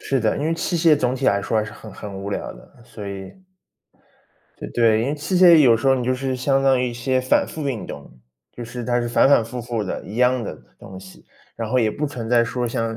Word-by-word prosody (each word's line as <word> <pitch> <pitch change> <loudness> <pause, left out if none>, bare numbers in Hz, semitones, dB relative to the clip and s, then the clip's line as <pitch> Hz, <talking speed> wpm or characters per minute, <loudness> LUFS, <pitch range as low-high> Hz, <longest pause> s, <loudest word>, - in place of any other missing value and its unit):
是 135 - -1
的， 110 -1 0
因 145 - -2
为 165 - 0
器 170 +1 -2
械 160 -2 +5
总 125 -1 0
体 130 0 -2
来 100 - +3
说 110 +3 -1
还 110 - +1
是 110 - -9
很 110 - -12
很 100 +1 -9
无 100 +1 -6
聊 - - -4
的， 120 - -18
所 110 -4 -10
以 95 -1 -7 1.3
对 - - -7
对， 115 -2 +3
因 125 - -1
为 145 - -1
器 155 +5 -2
械 175 -2 +8
有 125 -7 +6
时 135 +4 0
候 135 - +4
你 125 - -3
就 130 +1 +1
是 130 0 -3
相 135 +2 +1
当 135 -2 +3
于 125 - 0
一 120 - -7
些 130 +2 0
反 130 - +2
复 150 -3 -5
运 120 -5 -4
动， - - -9 0.4
就 120 - -8
是 120 +1 -7
它 120 0 0
是 120 - -3
反 120 +2 +4
反 135 -5 +4
复 120 +2 -6
复 120 -2 -3
的， 95 - -5
一 105 - -9
样 125 0 +2
的 - - -5 0.2
东 95 - -11
西， 95 0 -15 0.3
然 115 -2 -4
后 130 - 0
也 110 -3 +2
不 150 +7 -3
存 120 -5 -6
在 120 -1 +4
说 120 +1 -3
像 115 -2 -3
120 Hz, 285 characters per minute, -21 LUFS, 110-135 Hz, 1.3 s, 械